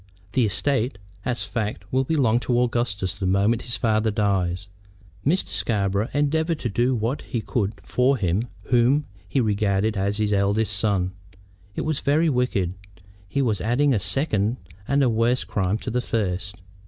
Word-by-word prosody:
The 120 0 +2
estate, 125 +1 0 0.3
as 120 -6 -1
a - - -13
fact, 105 -3 -3
will 130 +1 +3
belong 130 -6 +2
to 120 -1 +1
Augustus 120 -6 0
the 95 - -2
moment 100 +5 +2
his 120 - -3
father 110 -1 +2
dies. 95 -3 0 0.6
Mr. 175 +7 +1
Scarborough 100 +2 0
endeavored 160 +3 +1
to 120 - -1
do 120 +5 +1
what 115 +5 -1
he 120 - -3
could 105 -2 -2
for 130 +2 +2
him 95 +3 0 0.2
whom 125 +6 +3 0.2
he 135 - +1
regarded 105 -1 +1
as 100 +1 0
his 105 -1 +1
eldest 100 +1 +1
son. 95 -3 +1 0.6
It - - -2
was 155 -2 -1
very 155 +4 +2
wicked. 120 - 0 0.6
He 140 +5 0
was 105 -7 0
adding 130 +6 +2
a 110 - +2
second 110 - +1 0.3
and 140 0 +3
a - - +4
worse 115 +2 +2
crime 100 -1 -1
to 125 - -5
the 125 +2 0
first. 100 -4 -2
110 Hz, 165 wpm, -24 LUFS, 100-125 Hz, 0.6 s, a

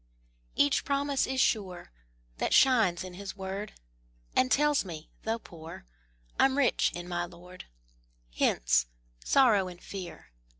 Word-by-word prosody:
Each 145 - +3
promise 280 0 0
is 265 0 -2
sure, 190 - 0 0.5
That - - +1
shines 220 -10 +4
in 185 -1 -8
His 195 +1 -8
word, 195 +2 -5 0.6
And 255 - +3
tells 295 0 +3
me, 165 -5 -9
though 225 +1 0
poor, 165 - -11 0.5
I'm 270 0 +4
rich 275 -4 +2
in 175 0 -6
my 175 -1 -2
Lord. 180 +1 -13 0.7
Hence! - - +2 0.4
Sorrow 220 -8 +4
and 175 -1 -10
Fear! 180 - -9
190 Hz, 130 wpm, -29 LUFS, 175-255 Hz, 0.7 s, shines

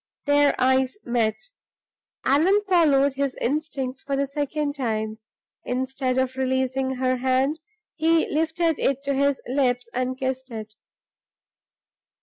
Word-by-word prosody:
Their 290 0 +4
eyes 260 +5 +2
met. 230 -3 0 0.9
Allan 365 +10 +4
followed 285 -7 +4
his 275 -1 -1
instincts 270 -2 -2
for 275 - -2
the 280 +1 +1
second 290 +1 -2
time. 220 -5 -2 0.4
Instead 260 0 -2
of 260 0 0
releasing 260 0 0
her 255 0 0
hand, 260 +4 +1 0.4
he 325 +1 +3
lifted 320 +1 0
it 275 0 0
to 280 0 0
his 280 0 +1
lips 250 -2 0
and 255 +1 -1
kissed 260 0 -3
it. 215 -2 -7
265 Hz, 125 wpm, -24 LUFS, 255-285 Hz, 0.9 s, Their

